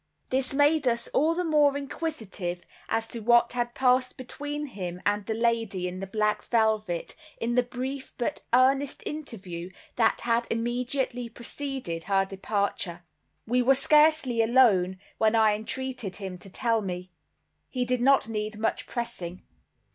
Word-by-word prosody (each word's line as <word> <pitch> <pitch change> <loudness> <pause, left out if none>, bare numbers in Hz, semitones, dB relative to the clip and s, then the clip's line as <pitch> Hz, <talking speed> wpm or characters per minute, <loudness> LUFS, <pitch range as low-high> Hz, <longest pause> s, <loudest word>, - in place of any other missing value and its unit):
This 260 0 +1
made 290 0 +3
us 235 -1 +1
all 320 +4 +2
the 360 - 0
more 295 -4 +3
inquisitive 220 - -4 0.2
as 225 0 0
to 235 - -4
what 235 +2 +4
had 240 -1 -2
passed 255 0 +2
between 290 +3 -5
him 180 -9 -6
and 205 0 +1
the 220 - -1
lady 225 -5 0
in 180 +1 -5
the 195 - -5
black 210 +1 0
velvet, 215 -6 0 0.2
in 235 +1 -1
the 250 - +4
brief 255 +2 -5
but 240 - -2
earnest 270 +3 +3
interview 190 - -6 0.3
that 225 -2 +3
had 235 0 +1
immediately 245 +1 -1
preceded 240 - -5
her 195 -1 +2
departure. 195 -3 -2 0.4
We 245 +3 +2
were 265 +2 +5
scarcely 300 -4 +4
alone, 220 -6 +4 0.2
when 220 +1 +3
I 220 -2 +5
entreated 230 -1 -4
him 190 -3 -6
to 195 - -12
tell 230 +2 0
me. 180 -2 -5 0.6
He 250 -2 -1
did 250 0 0
not 270 -2 +4
need 215 -1 -3
much 220 +1 -1
pressing. 185 -7 -5
235 Hz, 150 wpm, -27 LUFS, 205-260 Hz, 0.6 s, were